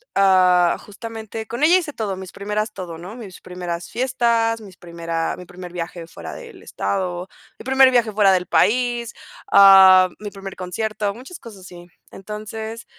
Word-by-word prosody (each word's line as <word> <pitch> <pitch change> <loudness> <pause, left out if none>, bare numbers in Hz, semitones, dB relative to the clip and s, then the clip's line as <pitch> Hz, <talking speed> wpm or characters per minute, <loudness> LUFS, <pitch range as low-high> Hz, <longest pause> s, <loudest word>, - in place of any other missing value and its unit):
ah, 185 -2 +4
justamente 220 +1 -8
con 240 +7 -4
ella 345 +4 +6
hice 330 -5 -4
todo, 210 -6 -3
mis 190 -2 -9
primeras 210 +2 -3
todo, 175 -4 -7
¿no? 180 +6 -9
Mis 210 -7 -11
primeras 180 -1 -6
fiestas, 235 -3 0
mis 195 -4 -13
primeras 170 -1 -4
mi 180 - -10
primer 180 0 -10
viaje 170 -1 -6
fuera - - -9
del - - -12
estado, 175 - -3 0.3
mi - - -10
primer 265 0 +5
viaje 235 -3 +2
fuera 200 -2 +4
del 180 -1 0
país, 235 +6 +1 0.4
ah, 190 -2 +8
mi 210 -1 -7
primer 195 -1 -9
concierto, 205 +3 -3
muchas 265 +9 -11
cosas 215 -5 -12
así. 175 -1 -13 0.2
Entonces, 215 +3 -7
200 Hz, 160 wpm, -21 LUFS, 180-225 Hz, 0.4 s, ah